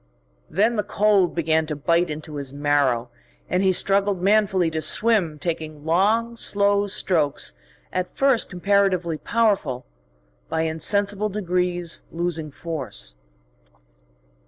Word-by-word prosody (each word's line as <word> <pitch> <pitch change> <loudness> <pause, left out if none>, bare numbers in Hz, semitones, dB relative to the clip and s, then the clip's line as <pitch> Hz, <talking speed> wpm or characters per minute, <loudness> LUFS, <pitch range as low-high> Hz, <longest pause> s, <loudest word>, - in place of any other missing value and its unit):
Then 215 +7 +1
the - - +2
cold 200 -4 +2
began 160 -1 +1
to 150 - -3
bite 170 +4 +1
into 150 0 -6
his 140 -2 -5
marrow, 140 -4 0 0.4
and 180 - 0
he 190 -1 +3
struggled 195 +1 +1
manfully 195 -3 +2
to 160 0 -2
swim, 180 -1 +3
taking 155 -1 -5
long, 215 +8 +1
slow 200 -2 +2
strokes, 160 - +1 0.4
at 185 0 -3
first 270 -4 +2
comparatively 185 -3 +1
powerful, 200 - 0 0.6
by 160 - -1
insensible 200 +6 0
degrees 180 -3 -2
losing 165 -2 -3
force. 135 - -6
175 Hz, 115 wpm, -23 LUFS, 155-200 Hz, 0.6 s, he